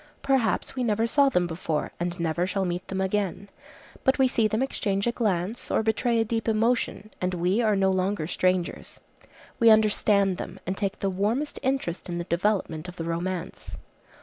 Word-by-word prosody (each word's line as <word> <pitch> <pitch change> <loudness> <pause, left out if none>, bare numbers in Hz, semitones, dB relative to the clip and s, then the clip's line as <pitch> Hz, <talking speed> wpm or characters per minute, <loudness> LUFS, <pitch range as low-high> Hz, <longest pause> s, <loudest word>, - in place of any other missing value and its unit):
Perhaps 265 -5 +1
we 255 - -1
never 220 -1 +1
saw 280 +4 +4
them 180 -8 +1
before, 165 -2 -3
and 175 +1 -3
never 170 +2 0
shall 190 0 -1
meet 175 0 -3
them 190 - -3
again. 200 0 -1 0.5
But 265 - +3
we 265 -1 +4
see 230 -3 +2
them 215 +4 0
exchange 200 -7 -1
a 240 - +2
glance, 210 -2 -1
or - - +1
betray 230 +2 +1
a 225 - +2
deep 225 +1 -2
emotion, 225 -1 0
and 180 0 0
we 180 +6 +1
are 215 -3 +3
no 190 -1 +3
longer 185 -2 0
strangers. 180 +1 -1 0.6
We 230 -2 +6
understand 205 -3 +4
them, - - -7
and 190 - -2
take 200 0 -3
the 195 - 0
warmest 220 +10 -1
interest 255 -10 -2
in 170 - -3
the 175 - -2
development 170 -2 -1
of 180 - -8
the 165 - -5
romance. 170 +1 -4
200 Hz, 185 wpm, -26 LUFS, 180-225 Hz, 0.6 s, We